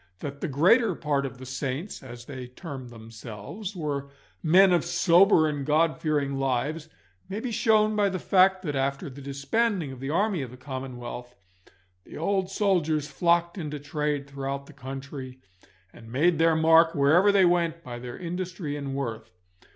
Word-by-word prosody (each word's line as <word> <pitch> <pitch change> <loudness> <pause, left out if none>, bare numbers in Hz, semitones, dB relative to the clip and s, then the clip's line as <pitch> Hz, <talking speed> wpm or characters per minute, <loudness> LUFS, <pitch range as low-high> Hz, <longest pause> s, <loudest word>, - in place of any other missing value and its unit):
That 140 -1 -6
the - - -1
greater 180 - +4
part 140 -3 -1
of 125 -1 -10
the 130 - -10
saints, 135 +7 -4
as 120 -2 -10
they 130 -2 -7
termed 130 -1 -8
themselves, 115 - -8
were 145 -4 -3 0.3
men 180 +3 +6
of 175 - +3
sober 175 0 +4
and 145 -2 -2
God 155 +3 +2
fearing 145 -3 0
lives, 140 +4 -1 0.4
may 200 +2 -3
be 245 +1 -4
shown 215 -1 +3
by 205 -1 +3
the 185 - -3
fact 190 +1 +3
that, 150 -5 -3
after 135 +1 -2
the 140 +2 -11
disbanding 150 +5 -1
of 130 - -10
the 135 +1 -5
army 195 +1 +1
of 130 - -5
the 125 - -12
Commonwealth, 125 -2 -7 0.7
the - - -11
old 190 +3 0
soldiers 165 -7 +1
flocked 170 +4 +1
into 150 -3 -5
trade 145 0 -2
throughout 140 0 -5
the 155 - -14
country, 135 -1 -8 0.5
and 115 -1 -13
made 160 +5 +2
their 165 0 +4
mark 165 +1 +5
wherever 160 +8 +5
they 195 -2 +5
went 170 -1 +1
by 120 -1 -7
their 120 0 -7
industry 175 -3 -4
and 140 -2 -4
worth. 120 -5 -4
150 Hz, 170 wpm, -26 LUFS, 135-175 Hz, 0.7 s, men